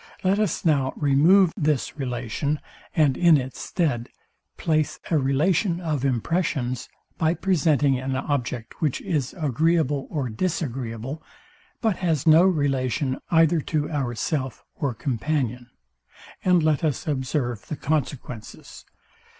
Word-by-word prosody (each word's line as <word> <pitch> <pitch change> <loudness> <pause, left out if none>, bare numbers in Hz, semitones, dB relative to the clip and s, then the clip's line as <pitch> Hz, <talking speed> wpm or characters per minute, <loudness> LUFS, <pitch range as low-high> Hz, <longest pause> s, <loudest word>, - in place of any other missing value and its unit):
Let 190 +2 +2
us 215 -2 -1
now 140 -5 +2
remove 160 +6 +5
this 150 -3 0
relation, 130 +2 -2 0.4
and 150 -5 +4
in 170 -1 +5
its 130 -1 -5
stead 135 -10 -1 0.5
place 155 -2 0
a 160 - +4
relation 165 +7 +1
of 155 -6 -2
impressions, 130 -1 -1 0.3
by 160 +1 +2
presenting 150 -8 +2
an 130 +1 -2
object, 125 -4 -3
which 150 -5 0
is 145 -6 -2
agreeable 150 -1 +1
or 145 -6 -2
disagreeable, 130 -2 -3 0.6
but 220 -5 +1
has 165 -6 0
no 160 +1 +7
relation 135 -5 0
either 165 -1 +4
to 150 +1 -2
ourself 130 -1 -2
or 135 -5 -2
companion; 125 0 -2 0.7
and 180 -3 +4
let 155 -2 +2
us 150 -4 -1
observe 130 -5 -2
the 155 - -3
consequences. 140 -6 -4
145 Hz, 120 wpm, -24 LUFS, 130-160 Hz, 0.7 s, no